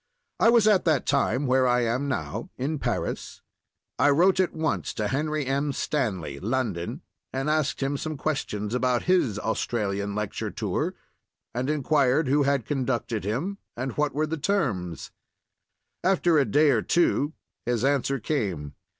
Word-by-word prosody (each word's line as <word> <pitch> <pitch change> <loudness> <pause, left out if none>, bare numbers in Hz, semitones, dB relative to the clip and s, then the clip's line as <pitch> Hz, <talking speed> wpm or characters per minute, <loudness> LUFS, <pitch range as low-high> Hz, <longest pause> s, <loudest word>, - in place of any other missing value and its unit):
I 225 - +6
was 230 -2 +5
at 205 -3 +5
that 155 -5 +2
time 140 0 +1
where 130 0 +3
I 125 0 +3
am 120 +4 0
now—in 140 +1 -3
Paris. - - -3 0.6
I 145 +3 +5
wrote 180 +7 +4
at 185 - +2
once 160 -1 -2
to 105 -2 -1
Henry 150 +3 -1
M. 140 +2 0
Stanley 95 - -2
(London), 110 -6 -2 0.3
and 135 +2 -2
asked 155 -3 0
him 140 +1 0
some 155 +1 -4
questions 110 -8 -2
about 125 -1 +1
his 170 - +2
Australian 100 -2 -2
lecture 105 -1 -3
tour, - - -2 0.6
and 125 +3 -2
inquired 145 -1 +2
who 145 +3 +3
had 140 -4 +1
conducted 125 -5 -1
him 145 - -2 0.2
and 130 +2 -2
what 150 -2 0
were 155 +1 +1
the 160 +1 -3
terms. 120 - -1 0.9
After 175 -3 +3
a 140 - +3
day 145 +7 +4
or 115 -4 +2
two 160 -1 +2 0.3
his 120 0 +1
answer 140 -1 +1
came. 95 - -2
135 Hz, 150 wpm, -26 LUFS, 115-155 Hz, 0.9 s, I